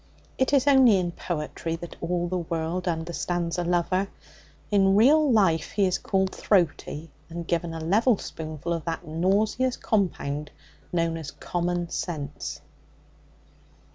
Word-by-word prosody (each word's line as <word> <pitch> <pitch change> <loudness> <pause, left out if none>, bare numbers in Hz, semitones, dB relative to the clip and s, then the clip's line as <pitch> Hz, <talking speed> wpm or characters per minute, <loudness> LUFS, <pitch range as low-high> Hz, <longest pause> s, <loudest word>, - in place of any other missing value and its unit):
It 260 - +2
is 275 -2 +4
only 265 -7 +6
in 175 -2 -1
poetry 165 -1 -4
that 170 +1 -8
all 175 +1 -1
the 180 +1 -1
world 170 +2 -3
understands 170 +1 -2
a - - 0
lover. 180 +2 +1 0.6
In 195 -1 +4
real 285 +7 +5
life 175 -8 +2
he 200 -1 +3
is 185 0 +1
called 190 -1 0
throaty, 165 -4 0 0.2
and 170 0 -6
given 170 0 0
a 165 - -5
level 205 +8 +3
spoonful 155 0 -5
of 165 -2 -3
that 165 -1 -3
nauseous 205 +10 +1
compound 150 -8 -1 0.4
known 165 -1 0
as 155 -3 -6
common 175 +1 -2
sense. 150 -4 -4
175 Hz, 140 wpm, -26 LUFS, 165-195 Hz, 0.6 s, only